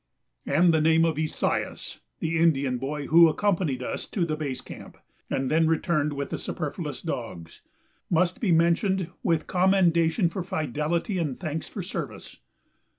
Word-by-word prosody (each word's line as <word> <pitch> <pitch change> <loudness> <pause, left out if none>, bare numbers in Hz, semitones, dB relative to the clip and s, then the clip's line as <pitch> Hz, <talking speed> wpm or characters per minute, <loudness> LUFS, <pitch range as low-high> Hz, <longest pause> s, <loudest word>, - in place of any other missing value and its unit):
And 165 +4 +4
the 160 - +3
name 160 +1 +4
of 160 -2 0
Esaias, 155 -1 -2 0.2
the 160 0 0
Indian 140 -6 +2
boy 145 +2 -4
who 165 +2 +7
accompanied 165 -8 0
us - - -4
to 180 -5 -1
the 155 -2 -2
base 145 -4 -3
camp, - - -11 0.3
and 135 -1 -1
then 160 +1 +3
returned 160 -2 +1
with 140 0 -4
the - - -3
superfluous - - -5
dogs, 85 -2 -6 0.5
must 175 +1 +1
be 205 -7 +2
mentioned, 170 +2 +2
with 165 -2 +1
commendation 180 -1 +3
for 175 +3 -4
fidelity 165 - -2
and 150 -6 -2
thanks 160 -2 -4
for - - -6
service. - - -6
160 Hz, 155 wpm, -26 LUFS, 150-170 Hz, 0.5 s, who